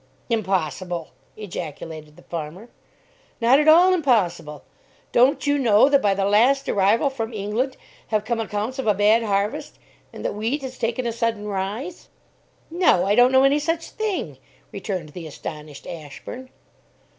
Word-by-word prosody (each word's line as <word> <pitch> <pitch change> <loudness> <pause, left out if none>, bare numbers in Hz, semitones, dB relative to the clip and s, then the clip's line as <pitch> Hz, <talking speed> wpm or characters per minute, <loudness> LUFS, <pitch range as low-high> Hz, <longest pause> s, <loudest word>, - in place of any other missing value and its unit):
"Impossible!" 185 -5 -1 0.3
ejaculated 160 -5 -7
the - - -17
farmer. 170 +7 -7 0.7
"Not 245 +4 +5
at 300 - +1
all 350 +4 +7
impossible. 185 - 0 0.5
Don't 260 +2 +3
you 285 0 +2
know 230 0 +5
that 280 -1 +4
by 200 -2 +2
the 195 0 0
last 245 +7 +3
arrival 210 +7 +2
from 230 -3 -4
England 220 +5 -2 0.3
have 215 -1 -1
come 235 0 -1
accounts 220 +4 -3
of 265 - -3
a 210 - +4
bad 210 +3 +4
harvest, 205 -1 -2 0.3
and - - -9
that - - -1
wheat 230 +7 -2
has 255 -1 -7
taken 235 +2 -1
a 235 - -1
sudden 230 -2 -2
rise?" 210 - -4 0.6
"No, 335 - +3
I 200 - +2
don't 245 +3 +5
know 265 0 +5
any 275 +2 +4
such 330 +2 -2
a - - -21
thing," 370 - -3 0.3
returned 185 -5 -5
the 165 +1 -8
astonished 150 -1 -9
Ashburn. 170 - -9
220 Hz, 155 wpm, -23 LUFS, 190-265 Hz, 0.7 s, all